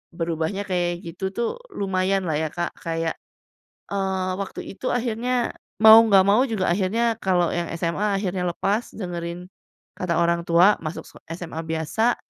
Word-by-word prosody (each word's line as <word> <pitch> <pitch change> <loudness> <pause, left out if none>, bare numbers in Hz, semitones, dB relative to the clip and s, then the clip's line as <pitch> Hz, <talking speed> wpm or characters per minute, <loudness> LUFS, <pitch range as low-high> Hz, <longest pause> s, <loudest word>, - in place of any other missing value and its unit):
berubahnya 165 +3 -2
kayak 175 -1 -1
gitu 170 +3 -9
tuh, 235 0 0 0.2
lumayan 190 0 0
lah 155 - 0
ya - - -3
Kak, 175 -1 -2
kayak, 165 0 -1 0.8
eee, 190 -2 -1
waktu 195 - -6
itu 200 - -10
akhirnya 245 +1 -1 0.3
mau 220 0 +11
gak 195 -1 +7
mau 210 +5 +5
juga 220 -6 -1
akhirnya 225 +5 0
kalau 180 -3 +2
yang 175 -1 -2
SMA 195 +5 0
akhirnya 180 -2 -2
lepas 205 +7 -1
dengerin 175 -2 -5 0.5
kata 180 -2 -1
orang 170 0 +1
tua, 175 +5 +5
masuk 155 +3 -4
se - - -16 0.2
SMA 165 -2 -5
biasa 160 +9 0
185 Hz, 150 wpm, -23 LUFS, 170-205 Hz, 0.8 s, mau